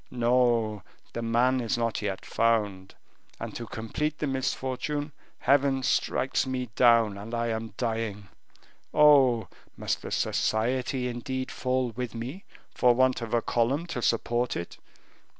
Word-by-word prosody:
No, 120 Hz, -3 st, +2 dB, 0.3 s
the 115 Hz, -, -3 dB
man 120 Hz, +3 st, +2 dB
is 120 Hz, +1 st, -1 dB
not 115 Hz, -2 st, -1 dB
yet 100 Hz, -2 st, -3 dB
found, 105 Hz, -5 st, 0 dB, 0.4 s
and -, -, -6 dB
to 115 Hz, -, -6 dB
complete 150 Hz, +9 st, -3 dB
the -, -, -2 dB
misfortune, 135 Hz, +2 st, -2 dB, 0.3 s
Heaven 135 Hz, 0 st, +2 dB
strikes 130 Hz, +1 st, +1 dB
me 125 Hz, -2 st, -3 dB
down, 115 Hz, -5 st, +4 dB
and 115 Hz, +4 st, -6 dB
I 115 Hz, 0 st, -1 dB
am 110 Hz, -2 st, -4 dB
dying. 110 Hz, -4 st, -3 dB, 0.7 s
Oh! 135 Hz, -6 st, +6 dB, 0.3 s
must -, -, -2 dB
the -, -, -7 dB
society 125 Hz, +3 st, 0 dB
indeed 130 Hz, +2 st, -4 dB
fall 130 Hz, -1 st, -1 dB
with 120 Hz, +1 st, -5 dB
me 130 Hz, -, -6 dB, 0.3 s
for 125 Hz, -1 st, +4 dB
want 130 Hz, 0 st, +2 dB
of 115 Hz, 0 st, -2 dB
a 115 Hz, -, +1 dB
column 130 Hz, +8 st, +1 dB
to 125 Hz, -, -3 dB
support 120 Hz, +1 st, 0 dB
it? 85 Hz, -, -7 dB
120 Hz, 140 wpm, -27 LUFS, 115-130 Hz, 0.7 s, Oh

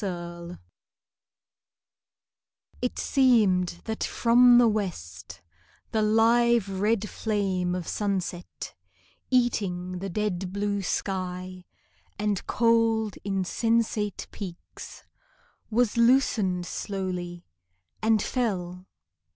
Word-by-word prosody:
FINIS 175 Hz, -2 st, -6 dB, 2.2 s
It 250 Hz, -, -2 dB
seemed 205 Hz, -10 st, +2 dB
that 220 Hz, -1 st, -3 dB
from 245 Hz, +1 st, +5 dB
the 240 Hz, -1 st, +6 dB
west 95 Hz, -, -4 dB, 0.5 s
The 220 Hz, -, +1 dB
live 225 Hz, +1 st, +3 dB
red 215 Hz, 0 st, +1 dB
flame 190 Hz, -6 st, -1 dB
of 180 Hz, -3 st, -5 dB
sunset, 190 Hz, -4 st, -3 dB, 0.6 s
Eating 185 Hz, -8 st, 0 dB
the 195 Hz, +1 st, -4 dB
dead 190 Hz, -1 st, -2 dB
blue 200 Hz, 0 st, -1 dB
sky 185 Hz, -1 st, -3 dB, 0.5 s
And 210 Hz, -2 st, -1 dB
cold 225 Hz, -2 st, +2 dB
insensate 210 Hz, +2 st, 0 dB
peaks, 180 Hz, -5 st, -9 dB, 0.7 s
Was 235 Hz, 0 st, +1 dB
loosened 230 Hz, -7 st, +3 dB
slowly, 180 Hz, -3 st, -4 dB, 0.6 s
and 220 Hz, -1 st, +3 dB
fell. 185 Hz, -7 st, -2 dB
200 Hz, 85 wpm, -26 LUFS, 180-225 Hz, 2.2 s, the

